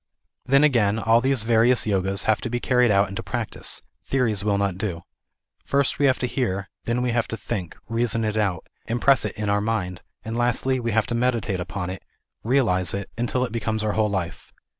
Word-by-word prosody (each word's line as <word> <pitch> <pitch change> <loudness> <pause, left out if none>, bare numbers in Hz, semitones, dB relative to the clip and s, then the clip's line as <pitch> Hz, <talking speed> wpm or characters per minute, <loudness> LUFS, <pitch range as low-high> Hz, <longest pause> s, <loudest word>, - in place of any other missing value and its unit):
Then 140 +2 +5
again, 115 -8 +3
all 115 +1 +3
these 135 -3 +1
various 115 +2 +3
Yogas, 100 -1 0
have 110 -2 +2
to - - -3
be 120 +1 -1
carried 125 -1 +3
out 100 0 +4
into 100 - -5
practice; - - -2 0.2
theories 115 -7 +1
will 105 -1 +1
not 100 -2 -1
do. 90 -5 -3 0.6
First 140 -1 +1
we 140 - +4
have 130 - +3
to - - -2
hear, 120 -6 -2
then 120 +1 0
we 125 - +1
have 115 -2 0
to 115 - -4
think; 95 -9 -5
reason 115 -1 0
it 105 0 -1
out, 100 -6 0 0.2
impress 120 +3 +3
it - - -4
in 105 -1 -2
our 100 0 +2
mind; 95 -5 -2 0.2
and 110 +1 -4
lastly, 125 +2 +1
we 115 -1 -2
kave 110 -1 +2
to 120 - -4
meditate 115 -5 0
upon 90 0 -4
it, 95 - -7 0.4
realize 110 - +2
it, 100 -1 -5
until 120 +2 0
it - - -7
becomes 110 -1 -2
our 105 - +1
whole 110 0 +1
life. 90 -4 -4
110 Hz, 205 wpm, -24 LUFS, 100-120 Hz, 0.6 s, Then